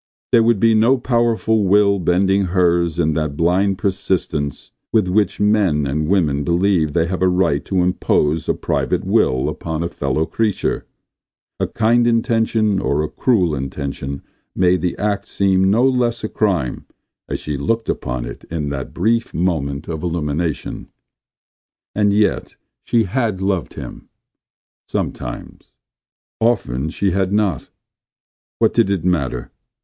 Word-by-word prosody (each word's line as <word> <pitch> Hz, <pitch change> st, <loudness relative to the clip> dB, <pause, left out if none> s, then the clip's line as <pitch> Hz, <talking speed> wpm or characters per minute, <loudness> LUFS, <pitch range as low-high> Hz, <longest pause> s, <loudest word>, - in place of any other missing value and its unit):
There 115 Hz, -, +6 dB
would 115 Hz, -2 st, +3 dB
be 115 Hz, +2 st, +4 dB
no 115 Hz, +5 st, +4 dB
powerful 115 Hz, -3 st, +1 dB
will 100 Hz, +1 st, +3 dB
bending 95 Hz, +3 st, +2 dB
hers 85 Hz, -2 st, +1 dB
in 80 Hz, -2 st, +1 dB
that 75 Hz, -2 st, -2 dB
blind 95 Hz, +4 st, +2 dB
persistence 90 Hz, -7 st, -2 dB, 0.2 s
with 110 Hz, -5 st, +2 dB
which 100 Hz, +1 st, +1 dB
men 100 Hz, -8 st, +2 dB
and 75 Hz, +3 st, -1 dB
women 75 Hz, -7 st, +1 dB
believe 85 Hz, -2 st, +1 dB
they 85 Hz, 0 st, +2 dB
have 90 Hz, +2 st, -3 dB
a 95 Hz, -, +4 dB
right 90 Hz, -5 st, +1 dB
to 95 Hz, -2 st, +1 dB
impose 80 Hz, -3 st, 0 dB
a -, -, +2 dB
private -, -, -1 dB
will 65 Hz, 0 st, +2 dB
upon 80 Hz, 0 st, -3 dB
a -, -, -1 dB
fellow 75 Hz, -2 st, -1 dB
creature. 110 Hz, +1 st, -1 dB, 0.7 s
A -, -, 0 dB
kind 120 Hz, +2 st, +2 dB
intention 115 Hz, -3 st, +1 dB
or 75 Hz, +2 st, 0 dB
a -, -, -1 dB
cruel 95 Hz, -11 st, +1 dB
intention 70 Hz, 0 st, -5 dB, 0.3 s
made 90 Hz, -1 st, +2 dB
the 90 Hz, 0 st, -2 dB
act 105 Hz, 0 st, -1 dB
seem 95 Hz, -1 st, +2 dB
no 120 Hz, +6 st, +4 dB
less 120 Hz, -3 st, 0 dB
a 110 Hz, -, -2 dB
crime 90 Hz, -, -1 dB, 0.4 s
as -, -, -2 dB
she 75 Hz, -, -4 dB
looked 110 Hz, +12 st, -1 dB
upon -, -, -3 dB
it -, -, -9 dB
in 75 Hz, -3 st, -3 dB
that 70 Hz, -2 st, -5 dB
brief 115 Hz, +6 st, 0 dB
moment 75 Hz, -5 st, -1 dB
of 80 Hz, -2 st, -4 dB
illumination. 80 Hz, -1 st, -3 dB, 1.1 s
And 105 Hz, -1 st, +2 dB
yet 105 Hz, +1 st, 0 dB, 0.3 s
she 115 Hz, -1 st, +2 dB
had 110 Hz, -1 st, -1 dB
loved 95 Hz, -3 st, -2 dB
him -, -, -9 dB, 0.4 s
— -, -, -82 dB
sometimes. -, -, -5 dB, 0.6 s
Often 80 Hz, -, 0 dB
she 95 Hz, +4 st, -1 dB
had 95 Hz, +1 st, 0 dB
not. 100 Hz, -9 st, 0 dB, 0.9 s
What -, -, +2 dB
did -, -, +3 dB
it 95 Hz, -4 st, -1 dB
matter! 70 Hz, -9 st, -1 dB
90 Hz, 145 wpm, -19 LUFS, 75-105 Hz, 1.1 s, There